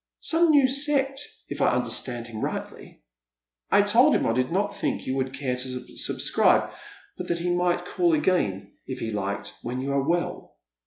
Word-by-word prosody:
" - - -65
Some 335 +1 +4
new 285 -4 +6
sect, 275 0 +1 0.3
if - - -6
I - - +3
understood 120 -2 -1
him 115 -2 -8
rightly. - - -6 0.7
I 205 - +5
told 240 +8 +4
him - - +1
I 115 - +1
did 130 +3 0
not 200 +3 -1
think - - -2
you 130 - -2
would 130 -1 -1
care 130 -2 -2
to 125 0 -5
subscribe, - - +3 0.5
but - - -4
that 170 - 0
he 175 +1 -1
might 175 0 0
call 175 -2 +1
again, 100 - 0 0.2
if 130 - -5
he 115 -3 -4
liked, 100 -1 -4
when 125 +2 -4
you 135 +2 -3
are 140 - +2
well." 170 +5 -2
155 Hz, 190 wpm, -25 LUFS, 125-205 Hz, 0.7 s, new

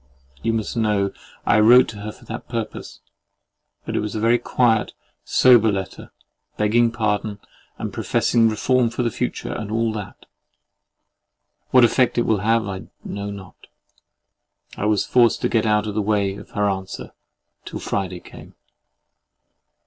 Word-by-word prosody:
You 115 - 0
must 110 0 -3
know 105 -4 +1 0.3
I 105 - +4
wrote 120 +4 +7
to 105 - -8
her 105 +1 -5
to - - -18
that 115 +1 -8
purpose, 115 -3 -6 0.8
but - - -4
it - - +1
was 105 0 -4
a - - -1
very 115 +2 +3
quiet, 115 -2 +1 0.3
sober 120 -4 +5
letter, 95 -1 -5 0.5
begging 115 +2 +3
pardon, 105 -2 -1 0.4
and - - -5
professing 115 -2 +2
reform 120 +3 +1
for 120 +2 -3
the 120 - 0
future, 125 - -3
and 105 -2 -5
all 115 0 0
that. 105 -2 -8 1.4
What 125 -2 +6
effect 125 +1 +2
it 120 - +3
will 110 -3 +1
have, 110 +2 +1
I 95 -1 -6 0.2
know 100 0 -5
not. 100 -2 -11 1.1
I - - -3
was 105 -1 +2
forced 120 -2 +3
to - - +1
get 115 -1 +1
out 105 0 +2
of 105 - -4
the 105 - 0
way 100 -2 0
of - - -12
her 105 0 +2
answer, 95 -1 -4 0.5
till - - -7
Friday 95 -3 -3
came. - - -14
110 Hz, 155 wpm, -22 LUFS, 100-115 Hz, 1.4 s, wrote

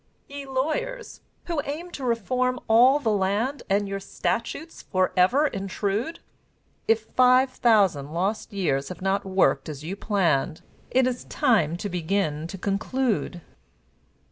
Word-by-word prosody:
Ye 280 -1 -8
Lawyers, 450 - -3 0.2
who 335 -4 -1
aim 330 +5 -5
to 275 - -7
reform 250 +2 0
all 245 +5 +6
the 245 -7 0
land, 210 +8 0
And 200 +1 +1
your 195 0 -3
statutes 235 - -3
forever 185 +8 +2
intrude, 205 - -2 0.7
If 225 0 +3
five 255 +3 +4
thousand 195 - +2
lost 195 +8 -2
years 140 -9 -1
have 180 - -8
not 195 +1 0
worked 190 -3 +2
as 150 -1 -7
you 175 +5 -4
planned, 175 -9 0 0.3
It 260 0 +3
is 250 -1 -2
time 205 - +2
to 205 - -4
begin 175 -3 -1
to 195 - -7
conclude. 200 0 -1
210 Hz, 135 wpm, -25 LUFS, 185-260 Hz, 0.7 s, all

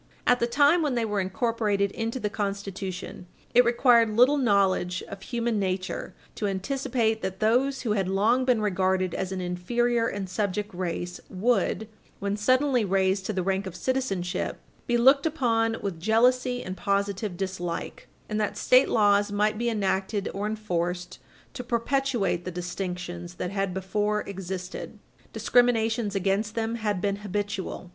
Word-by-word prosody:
At 245 0 +4
the 235 - +1
time 290 +7 +4
when 290 -5 0
they 235 -1 +1
were 210 -2 -1
incorporated 200 0 0
into 230 +4 -3
the 210 - -1
Constitution, 195 -3 -5 0.3
it 245 - +7
required 235 -1 +4
little 250 +7 +4
knowledge 195 -6 +2
of 200 -1 -9
human 235 0 -1
nature 185 -1 -3 0.2
to 210 - -2
anticipate 225 +2 -1
that 190 0 -4
those 255 +5 +2
who 230 - -1
had 195 -3 +1
long 215 +7 +2
been 250 -4 +2
regarded 185 -2 +1
as 190 0 -3
an 190 -1 -3
inferior 230 +7 0
and 200 -3 -4
subject 205 +1 -2
race 175 0 -4
would, 220 +2 0 0.3
when 200 0 -2
suddenly 255 +3 +2
raised 190 0 +1
to 215 - -1
the 185 -2 -1
rank 190 +1 -1
of 185 - -7
citizenship, 195 -7 -2 0.3
be 240 - +2
looked 270 +5 +5
upon 230 -7 +1
with 190 -5 -3
jealousy 245 +5 +2
and 185 +1 -6
positive 200 0 -1
dislike, 180 -3 -4 0.2
and 215 0 -1
that 210 - -2
State 255 +2 +5
laws 205 -1 +3
might 210 +1 +1
be 235 0 +1
enacted 200 -1 -1
or 205 +1 -2
enforced 180 -4 -3 0.3
to 250 - -6
perpetuate 235 -6 0
the 185 - -4
distinctions 180 -1 -5
that 180 - -4
had 195 -1 -1
before 205 +3 -1
existed. 190 -1 -6 0.3
discriminations 225 -3 +2
against 195 +3 0
them 225 0 -1
had 210 -5 -1
been 200 0 0
habitual. 205 -2 -4
205 Hz, 155 wpm, -26 LUFS, 190-235 Hz, 0.3 s, it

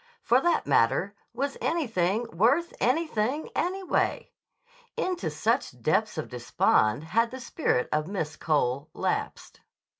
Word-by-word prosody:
For 245 +3 +4
that 345 +2 +1
matter, 145 - +2 0.2
was 275 +4 -3
anything 225 - 0
worth 265 - +2
anything, 265 0 0
anyway? 375 +1 -1 0.7
Into 365 -1 -1
such - - -1
depths 215 -4 +1
of 155 - -3
despond 120 0 +1
had 230 +8 +1
the 260 - -8
spirit 240 - 0
of 155 +1 0
Miss 160 -6 -3
Cole 145 -2 0
lapsed. - - -3
220 Hz, 120 wpm, -27 LUFS, -, 0.7 s, For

